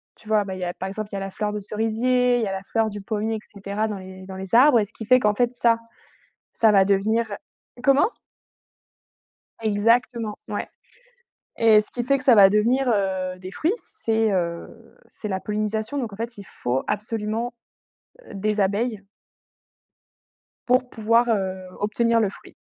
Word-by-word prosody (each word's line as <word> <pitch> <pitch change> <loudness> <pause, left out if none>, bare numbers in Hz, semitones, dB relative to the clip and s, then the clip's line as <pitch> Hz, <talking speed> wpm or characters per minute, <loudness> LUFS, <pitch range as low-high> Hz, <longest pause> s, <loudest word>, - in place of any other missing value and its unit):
tu 215 - -19
vois, 215 -1 +3
bah, 190 -1 -6
il - - -8
y - - -4
a, 175 - -3
par 190 - -5
exemple, 205 +2 -5
il - - -5
y - - -2
a - - -2
la 195 0 -4
fleur 210 +1 -3
de 210 - -3
cerisier, 235 +4 +1
il - - 0
y - - -1
a - - -2
la 190 0 -4
fleur 225 +2 0
du 205 0 -7
pommier 215 +2 -2
et - - -4 0.2
cetera 200 +2 -2
dans 210 -2 -4
les 185 0 -11
dans 190 0 -8
les 190 +2 -2
arbres 255 0 +7
et 210 - +1
ce 215 - -12
qui 220 - -8
fait 255 +3 +5
qu'en 210 -3 +2
fait 245 +2 +1
ça 230 -2 +2 0.7
ça 220 -2 +4
va 195 -2 +5
devenir 215 +4 +2 0.6
comment? 275 - +4 1.5
Exactement, 225 +1 +1
ouais - - -3 0.9
et 220 -2 +6
ce 210 - -8
qu'il 240 - -3
fait 275 +2 +2
que 270 - -9
ça 255 - +7
va 195 -3 +8
devenir, 235 +6 +2
heu, 190 -2 -1
des 185 0 -8
fruits, 315 - 0
c'est, 225 - -1
heu, 170 -3 -2 0.4
c'est - - -5
la 190 -2 -2
pollinisation 215 +4 -2
donc, 240 -6 -3
en - - -9
fait, 230 +2 -5
il 200 - -9
faut 130 -7 -2
absolument, 220 +2 -2 0.7
heu, - - -12
des 210 +1 -1
abeilles 205 +2 0 1.7
pour 250 0 +2
pouvoir, 230 +2 +2
heu, 190 -3 -1 0.2
obtenir 230 +3 +1
le 215 - +2
fruit. 195 - -13
215 Hz, 195 wpm, -23 LUFS, 195-230 Hz, 1.7 s, va